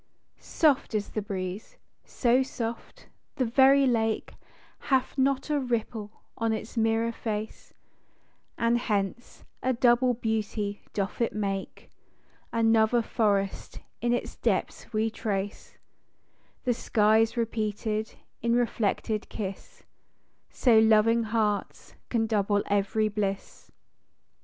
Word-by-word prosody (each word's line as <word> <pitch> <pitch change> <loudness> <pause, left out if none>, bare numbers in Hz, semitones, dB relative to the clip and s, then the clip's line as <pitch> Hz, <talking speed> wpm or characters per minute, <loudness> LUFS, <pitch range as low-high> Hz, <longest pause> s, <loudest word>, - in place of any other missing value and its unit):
Soft 290 -7 +1
is 205 -1 -1
the 215 - -3
breeze; 195 - -5 0.3
â - - -29
so 245 +1 +3
soft 235 -3 -5
â - - -28
the 255 - 0
very 270 +3 +5
lake 225 -3 0 0.5
Hath 265 -2 0
not 275 +1 +1
a 295 - +2
ripple 225 -4 -3
on 225 -1 0
its 220 +2 -6
mirror 225 0 +1
face; 220 -2 -5 0.8
And 235 +1 +2
hence, 210 0 -3 0.2
a 260 - +1
double 245 +1 +3
beauty 215 -2 -2
doth 200 +3 -3
it 235 - +1
make, 195 -2 -4 0.6
Another 225 0 +3
forest 200 -4 -1 0.2
in 240 +1 +1
its 245 - -2
depths - - -1
we 220 0 0
trace, 205 -2 -4 0.9
The 250 - +2
sky 220 -1 +3
's 225 +2 -4
repeated 220 -1 -2 0.3
in 235 0 +2
reflected 220 -2 -1
kiss 195 -2 -7 0.7
:â - - -29
So 235 -4 +5
loving 220 +1 +4
hearts 215 -2 -2 0.2
can 230 -2 +1
double 205 -2 +1
ev'ry 205 +2 +1
bliss. 200 -2 -4
225 Hz, 120 wpm, -27 LUFS, 210-240 Hz, 0.9 s, very